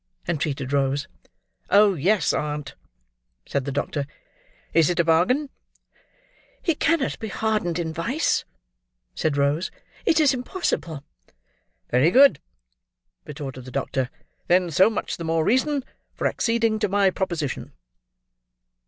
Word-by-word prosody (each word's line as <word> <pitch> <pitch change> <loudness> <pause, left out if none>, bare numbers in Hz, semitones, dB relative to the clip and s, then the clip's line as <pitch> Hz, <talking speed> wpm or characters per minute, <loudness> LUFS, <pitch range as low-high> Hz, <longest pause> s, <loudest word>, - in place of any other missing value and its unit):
entreated 145 -5 -2
Rose. 140 0 +1 0.6
"Oh 205 0 +6
yes, 180 +4 +2
aunt!" 150 -1 -3 0.7
said 140 -2 -2
the 140 - -3
doctor. 145 0 -2 0.7
"Is 165 -2 +4
is 175 - -1
a - - +5
bargain?" 185 - +2 1.1
"He 335 - +2
cannot 320 -1 0
be 220 - -4
hardened 210 -5 -1
in 165 -2 -3
vice," 230 - 0 0.7
said 155 -3 -1
Rose; 145 +5 +1 0.3
"It 320 - +3
is 295 -3 +4
impossible." 245 - -3 0.9
"Very 130 +6 +4
good," 255 - +6 0.9
retorted 135 -4 -7
the - - -8
doctor; 130 -1 -2 0.4
"then 180 -1 +3
so 190 +7 +5
much 220 - -3
the 170 - -6
more 160 -1 0
reason 270 +3 +1 0.3
for - - -4
acceding 230 -2 +1
to 210 -2 0
my 200 -1 +3
proposition." 170 -8 -3
170 Hz, 125 wpm, -24 LUFS, 145-220 Hz, 1.1 s, Oh